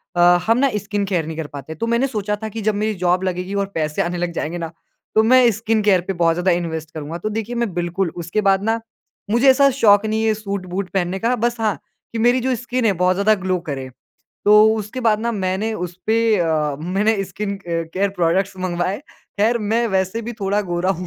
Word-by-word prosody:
अ, - - -1 0.3
हम 230 +1 +4
ना 275 +2 +3
skin 205 0 -2
care 180 -5 -1
नहीं 160 0 -6
कर 160 -2 -4
पाते 145 +3 -7
तो 230 - -3
मैंने 235 +3 +2
सोचा 210 -4 -2
था 220 - -3
कि 225 +1 -6
जब 215 - +2
मेरी 215 +1 0
जॉब 180 +1 +2
लगेगी 180 +1 -3
और - - -2
पैसे 155 -1 -1
आने 175 +1 -2
लग 175 0 -2
जाएँगे 165 +1 -3
ना 165 -2 -5 0.4
तो 220 - +5
मैं 250 +1 +6
स्किन 220 +1 0
केयर 195 -3 +4
पे 195 - -1
बहुत 170 -2 +2
ज़्यादा 180 +2 +1
इन्वेस्ट 160 -2 -2
करूँगा। 155 +1 -5
तो 195 +5 -3
देखिए 225 +2 -4
मैं 235 -5 -1
बिल्कुल 175 +1 -1
उसके 170 +6 -1
बाद 195 0 +3
ना 225 +1 +1 0.5
मुझे 240 +4 +5
ऐसा 275 +1 +6
शौक 205 -1 +6
नहीं 220 +1 0
है 220 - +3
सूट-बूट 200 -3 -4
पहनने 190 0 -1
का 235 +5 +1
बस 240 0 0
हाँ 215 -3 +1 0.4
कि 230 - -4
मेरी 245 +3 +4
जो 255 +1 0
स्किन 245 +1 -2
है 210 - +4
बहुत 180 +1 +2
ज़्यादा 205 +3 +3
ग्लो 185 -1 0
करे। 135 -2 -4 0.6
तो 205 - +5 0.2
उसके 215 +3 -5
बाद 220 -3 +2
ना 235 +1 -1
मैंने 195 +2 -1
उसपे 185 +4 -2 0.2
अ, 155 -4 0
मैंने 195 +5 +1
स्किन 200 +2 -4
अ - - -15
केयर 170 +4 -1
प्रोडक्ट्स 185 +3 +1
मँगवाएँ 185 +1 -2 0.4
ख़ैर 230 +3 +3
मैं 235 +1 +2
वैसे 190 +5 -1
भी 240 - -3
थोड़ा 200 +1 +1
गोरा 175 +2 0
हूँ। 180 -1 -3
195 Hz, 220 wpm, -20 LUFS, 175-220 Hz, 0.6 s, मैं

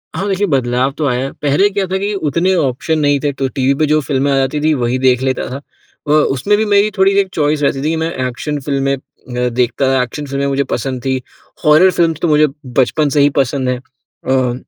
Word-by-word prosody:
हाँ, 195 - -2
देखिए 195 +1 +1
बदलाव 130 -2 0
तो 155 - -1
आया 125 -1 0
है। 135 - -5
पहले 150 +8 +3
क्या 195 -1 -1
था 190 +1 -1
कि 200 +2 -2
उतने 175 0 0
ऑप्शन 155 +2 0
नहीं 145 -1 +2
थे, 145 0 -1
तो 135 -1 -2
टीवी 135 +1 0
पे 155 +2 +1
जो 155 +1 +2
फ़िल्में 140 0 0
आ - - +2
जाती 135 +2 0
थीं 155 0 +2
वही 120 +2 0
देख 125 -1 +3
लेता 130 -1 -1
था। 130 - -5 0.5
अ, - - 0
उसमें 150 +6 +2
भी 220 - +1
मेरी 205 +1 +3
थोड़ी-सी 195 +1 +3
एक 195 - +1
चॉइस 150 -1 0
रहती 135 -1 +1
थी 155 - 0
कि 165 - 0
मैं 165 - -2 0.2
एक्शन 145 +4 -4
फ़िल्में 140 0 -1 0.4
मैं 125 -1 -1
देखता 125 +2 0
था 130 -1 +2
एक्शन 145 +4 -6
फ़िल्में 140 0 -2
मुझे 140 0 0
पसंद 130 +1 -3
थी। 130 -1 0 0.5
हॉरर 155 +5 +6
फ़िल्म्स 165 -3 0
तो - - +1
मुझे 150 -1 +4 0.2
बचपन 135 +4 +1
से 145 +1 +2
ही 145 - +5
पसंद 130 -1 0
है। 125 - 0
अ, 130 0 -3
140 Hz, 235 wpm, -16 LUFS, 130-155 Hz, 0.5 s, हॉरर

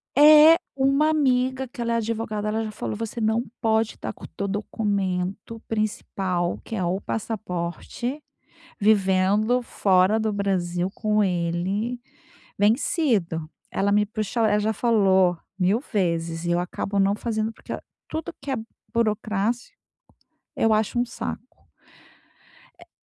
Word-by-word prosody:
Eh, 305 +2 +9 0.2
uma 275 +3 +3
amiga 260 -3 +1
que 240 0 -8
ela 235 0 0
é - - +1
advogada, 220 -2 -2
ela 220 +1 0
já 215 - -4
falou: 210 - -4
"Você 225 +2 -5
não 220 +2 +2 0.2
pode 220 -1 +2
estar - - -5
com - - -18
o - - -6
teu 200 - -4
documento 200 0 -2
principal, 195 -5 -1
que 225 - -6
é 190 - -1
o 180 +3 0
passaporte, 220 - -4 0.6
vivendo 205 +3 +3
fora 190 -1 +3
do 220 -1 0
Brasil 185 -3 -1
com 215 -1 +1
ele 185 +6 -1 0.6
vencido, 205 - +1 0.2
ela 200 +1 0
me 210 0 +3
puxou 215 +2 -2
a - - +4
ela 210 0 +3
já 215 +1 +1
falou 195 -6 +3 0.2
1000 195 +5 +2
vezes 170 - -1
e 175 - -1
eu 175 - +2
acabo 195 +3 -3
não 195 +1 +3
fazendo, 220 0 -2
porque - - -10
a - - -5 0.3
tudo 320 0 -4
que 280 - -6
é 265 - 0 0.4
burocrático 220 +1 -1 0.8
eu 225 - +3
acho 215 +2 0
um 240 - +3
saco. 230 -2 -5 1.4
É - - -16
215 Hz, 145 wpm, -24 LUFS, 190-230 Hz, 1.4 s, Eh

